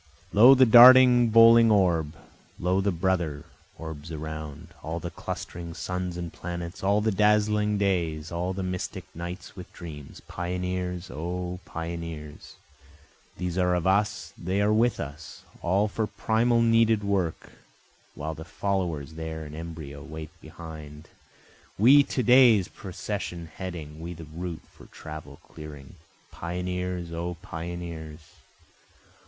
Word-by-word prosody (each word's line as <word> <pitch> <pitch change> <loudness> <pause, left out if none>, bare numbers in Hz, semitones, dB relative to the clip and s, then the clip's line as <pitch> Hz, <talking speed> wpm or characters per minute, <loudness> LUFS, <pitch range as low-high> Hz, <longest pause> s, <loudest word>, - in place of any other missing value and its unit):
Lo, 120 +6 +8
the 130 0 +6
darting 125 0 +8
bowling 115 +1 +7
orb! 85 -7 +2 0.4
Lo, 90 +2 +1
the 100 +1 +1
brother 85 -4 -1 0.3
orbs 80 -1 -8
around, 80 -2 -7
all 80 +2 -4
the 85 0 -6
clustering 85 -1 -7
suns 90 -1 -4
and 85 -2 -6
planets, 85 +1 -6
All 100 +2 +3
the 110 +1 +1
dazzling 105 +1 +2
days, 85 -6 -1
all 85 +2 -2
the 95 0 -4
mystic 90 0 -4
nights 90 +2 -7
with 90 -3 -10
dreams, 75 -5 -10
Pioneers! 90 0 -4
O 90 +3 -4
pioneers! 80 -3 -7 0.8
These 90 0 -3
are 90 -1 +2
of 90 - -2
us, 100 +3 +1
they 95 +3 -2
are 105 +1 +3
with 115 +2 +2
us, 75 +2 -8 0.2
All 95 +4 +2
for 110 +1 -2
primal 115 +2 +1
needed 115 -2 +3
work, 95 -5 -2 0.6
while 80 +2 -4
the 80 +1 -9
followers 85 -5 -3
there 80 0 -6
in 75 - -10
embryo 80 -3 -8
wait 80 0 -8
behind, 80 -1 -10 0.7
We 130 +8 +7
to 135 -2 -2
day's 120 -5 +6
procession 90 -3 -6
heading, 80 -5 -7
we 85 +1 -6
the 80 - -9
route 85 +2 -6
for - - -16
travel 75 -2 -10
clearing, 75 0 -11 0.3
Pioneers! 90 0 -4
O 85 +1 -3
pioneers! 85 -2 -7
90 Hz, 130 wpm, -26 LUFS, 80-100 Hz, 0.8 s, Lo